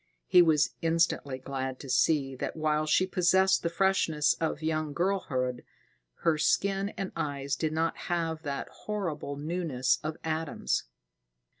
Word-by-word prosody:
He 180 - +6
was 155 -3 +3
instantly 165 -5 +1
glad 130 0 -4
to 140 - -9
see 135 +1 +2
that - - -4
while 155 -1 0
she 185 +4 +4
possessed 190 +1 +3
the 170 - -1
freshness 170 -4 +2
of 160 -1 -1
young 155 -1 -1
girlhood, 140 -9 -1 0.6
her 160 -2 +3
skin 195 +5 +1
and 195 - -3
eyes 140 -1 -2
did 155 -1 -1
not 160 +1 0
have 165 -2 -1
the 140 -3 -3
horrible 175 -9 -4
newness 145 -4 0
of 155 +1 -3
Adam's. 160 - -1
155 Hz, 140 wpm, -29 LUFS, 140-170 Hz, 0.6 s, He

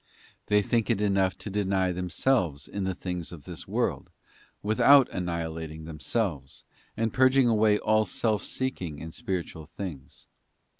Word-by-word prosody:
They 105 0 +3
think 115 +2 0
it 115 -4 +2
enough 95 -3 +1
to 105 - -7
deny 95 -2 +1
themselves 90 - 0
in 100 -1 -4
the 95 -1 -2
things 90 -2 -5
of 80 -5 -10
this - - -9
world, - - -1 0.5
without 130 +6 +6
annihilating 80 -3 -4
themselves, 75 - -3 0.3
and 115 0 0
purging 130 0 +5
away 110 -2 +4
all 110 +1 +2
self 105 +2 0
seeking 95 - -3
in 80 +2 -7
spiritual 85 -4 -4
things. 80 -8 -8
95 Hz, 140 wpm, -27 LUFS, 80-110 Hz, 0.5 s, without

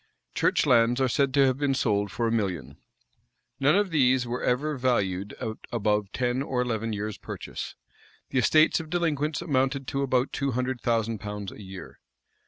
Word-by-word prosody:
Church - - +2
lands 120 -2 +4
are 130 - +3
said 140 +1 +1
to 140 -1 +6
have 130 0 +1
been 140 -2 +1
sold 105 -5 0
for 115 - -1
a - - 0
million.[v*] 90 - -2 0.8
None 145 +4 +4
of 205 -2 +2
these 130 -4 +3
were 120 +1 -3
ever 145 +5 0
valued 100 -7 0
at 110 0 -5
above 105 -3 0
ten 125 +1 0
or 135 -2 -2
eleven 115 -2 -1
years' 105 0 -4
purchase.[v] - - -7 0.5
The 130 - +2
estates 155 +7 +4
of 160 -1 -7
delinquents 155 -3 0
amounted 135 -2 0
to 135 - -1
above 130 -1 +1
two 140 -2 -1
hundred 125 0 -2
thousand 115 -2 0
pounds 105 -2 -6
a - - -11
year. 95 -1 -10
125 Hz, 180 wpm, -27 LUFS, 110-135 Hz, 0.8 s, to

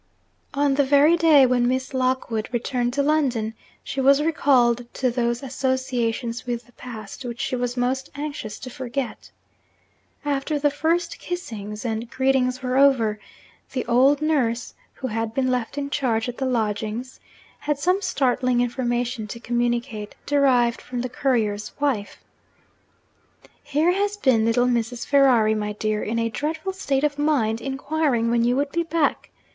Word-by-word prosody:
On 285 0 +2
the 285 +1 +3
very 285 +4 +5
day 320 -5 +6
when 245 -1 +2
Miss 260 +2 -1
Lockwood 255 -4 -1
returned 245 0 -1
to 280 +1 +1
London, 260 -7 +1 0.3
she 270 - -3
was 275 +2 +5
recalled 245 -6 +2
to 255 -2 +1
those 240 +1 -1
associations 255 -3 -2
with 240 -1 -3
the 245 - -22
past 230 0 -9
which 240 0 -6
she 275 -1 -1
was 245 0 -2
most 260 +2 -1
anxious 285 -8 -5
to 255 - -7
forget. 255 -1 -5 1.0
After 290 +1 -1
the 290 0 +2
first 330 +4 -1
kissings 215 - -6
and 225 0 -3
greetings 260 -1 +1
were 255 0 0
over, 235 -7 +4 0.5
the 260 - -2
old 265 +5 +4
nurse 245 -7 0 0.2
(who 265 - -8
had 225 0 -3
been 255 -1 +1
left 250 +2 -2
in 280 0 -3
charge 230 -5 0
at 245 - -6
the 265 - 0
lodgings) 225 +1 -2 0.4
had 295 -1 -1
some 365 +7 +1
startling 255 -6 +1
information 245 -1 -1
to 235 +3 -7
communicate, 240 -2 -2
derived 255 -5 +3
from 250 -1 -5
the 250 - -3
courier's 220 -6 -1
wife. 260 -8 -2 1.4
'Here 310 +5 +1
has 405 +2 0
been 255 - +3
little 235 +2 +3
Mrs. 240 -1 -1
Ferrari, 255 -6 +4
my 210 -1 -2
dear, 215 0 -1
in 225 +2 -2
a 230 0 +1
dreadful 315 - -3
state 280 -7 -1
of 290 -1 0
mind, 240 -7 +1
inquiring 270 -3 0
when 235 -1 +2
you 245 +1 +2
would 280 +1 0
be 340 - 0
back. 330 -3 0
255 Hz, 155 wpm, -23 LUFS, 235-280 Hz, 1.4 s, day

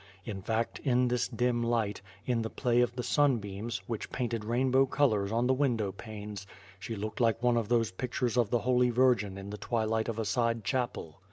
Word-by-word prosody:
In 100 -3 -5
fact, 110 +3 -1
in 125 -2 +2
this 125 0 +1
dim 120 -1 0
light, 115 -4 0 0.2
in 120 -2 +1
the 110 - -3
play 120 -1 +1
of 120 0 0
the 125 - -3
sunbeams, 120 -5 0
which 115 -3 -4
painted 115 -3 -2
rainbow 130 +4 +2
colors 110 -8 +1
on 115 +2 +1
the 130 - +3
window 120 -7 +1
panes, 105 -1 -8 0.3
she 105 +3 -5
looked 110 +1 -5
like 115 0 +2
one 120 -1 +4
of 115 -3 0
those 115 -4 +2
pictures 125 +4 -2
of 120 -4 +2
the 120 - +2
Holy 125 -1 +3
Virgin 120 -6 +2
in 100 +1 -7
the 105 - -6
twilight 110 -1 0
of 115 - -3
a 110 - -1
side 115 -1 0
chapel. 120 - -3
115 Hz, 200 wpm, -30 LUFS, 105-125 Hz, 0.3 s, one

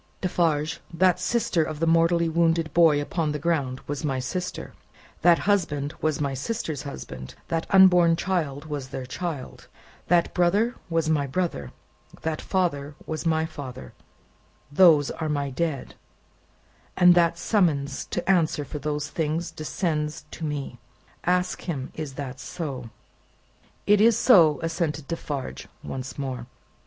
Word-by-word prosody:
Defarge, 160 -4 0
that 180 +1 +3
sister 180 -2 +1
of 155 -1 -5
the 165 - +1
mortally 165 +1 +3
wounded 165 -1 +1
boy 165 -4 +5
upon 150 +1 -1
the - - -2
ground 140 -5 -1
was 145 0 -4
my 135 -3 0
sister, 155 +8 -4 0.5
that 175 -1 +6
husband 160 -8 0
was 155 -2 0
my 140 -2 -1
sister's 155 - -3
husband, 65 - -8
that 165 0 -1
unborn 180 -3 +6
child 160 -5 -2
was 145 -4 -5
their 130 -1 -5
child, 150 0 -6 0.4
that 175 -1 +3
brother 200 +7 +2 0.2
was 165 -1 0
my 150 -3 +1
brother, 140 - -2 0.5
that 160 -1 -2
father 150 -6 -1
was 160 +1 -3
my 160 0 +2
father, 135 - -8 0.8
those 155 -3 +6
dead - - -6
are 155 - -1
my 140 -2 -1
dead, 140 0 -2 1.0
and 180 -1 +7
that 170 -1 +3
summons 145 -10 +1
to 175 -1 -4
answer 165 -6 +2
for 150 - -6
those 150 0 -2
things 160 +2 -2
descends 155 -1 -3
to - - -8
me!' 145 -5 -4 0.5
Ask 180 +1 +1
him, 135 -5 -3
is 150 -4 -6
that 135 -2 -6
so." 135 -5 -5 1.0
"It 210 0 +5
is 230 0 +5
so," 165 - +6
assented 160 -3 -2
Defarge 145 -5 -5 0.2
once 130 -1 -6
more. 130 -4 -4
160 Hz, 145 wpm, -25 LUFS, 145-175 Hz, 1.0 s, and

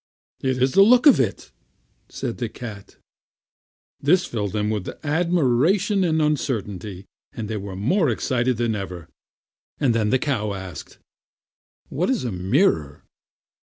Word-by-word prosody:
"It 130 -1 -1
is 130 - +2
the 195 - +5
looks 245 +7 +6
of 280 - +7
it," 115 -7 -2 0.6
said - - -5
the - - -2
cat. 105 -5 -9 1.0
This 175 +5 +3
filled 105 - -3
them 105 0 -1
with 105 -4 -3 0.2
admiration 175 - +2
and 160 -3 +1
uncertainty, 105 - -2 0.3
and 110 -2 -5
they 110 0 -3
were 100 -1 -6
more 145 - +1
excited 120 +1 0
than 120 -1 0
ever. 95 -5 -6 0.7
Then 115 -5 +1
the 130 - +3
cow 120 -7 -1
asked: 95 -6 -9 0.9
"What 175 +5 -1
is 260 -4 0
a 120 - -2
mirror?" 90 - +1
120 Hz, 135 wpm, -23 LUFS, 100-160 Hz, 1.0 s, of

